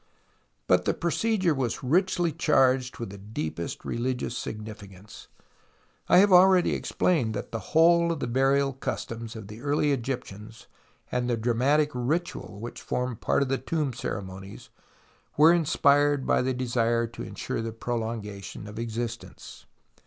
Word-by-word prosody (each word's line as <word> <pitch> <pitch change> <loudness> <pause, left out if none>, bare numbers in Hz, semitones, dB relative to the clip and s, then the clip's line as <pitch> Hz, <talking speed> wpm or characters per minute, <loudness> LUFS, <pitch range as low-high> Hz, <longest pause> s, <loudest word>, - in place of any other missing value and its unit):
But 90 0 +3
the - - +1
procedure 185 +1 +1
was 130 -3 -2
richly 175 +4 +2
charged 135 -5 +2
with 115 -5 -6
the 100 - -10
deepest 90 -5 -5
religious 125 0 -2
significance. 105 -3 -8 0.8
1 - - +6
have 195 +1 +6
already 185 0 +6
explained 125 -12 0
that - - -5
the 115 - -3 0.2
whole 170 +1 +5
of 165 - -3
the - - -2
burial 135 +3 +2
customs 115 -3 -5
of 110 -3 -8
the 110 +3 -10
early 145 +1 +1
Egyptians 115 -4 -5 0.5
and 125 0 -1
the 120 - +1
dramatic 130 +7 +2
ritual 135 - -2
which 120 +2 -7
formed 125 -2 -3
part - - +2
of - - -3
the 135 - 0
tomb 150 -5 -2
ceremonies 95 -4 -7 0.7
were 160 +3 +7
inspired 145 -3 +3
by - - +2
the 130 0 -1
desire 120 -2 +1
to 115 +1 -9
ensure - - -4
the 115 0 -4
prolongation 110 -4 -5
of 105 +1 -8
existence. 115 0 -6
125 Hz, 145 wpm, -27 LUFS, 110-145 Hz, 0.8 s, were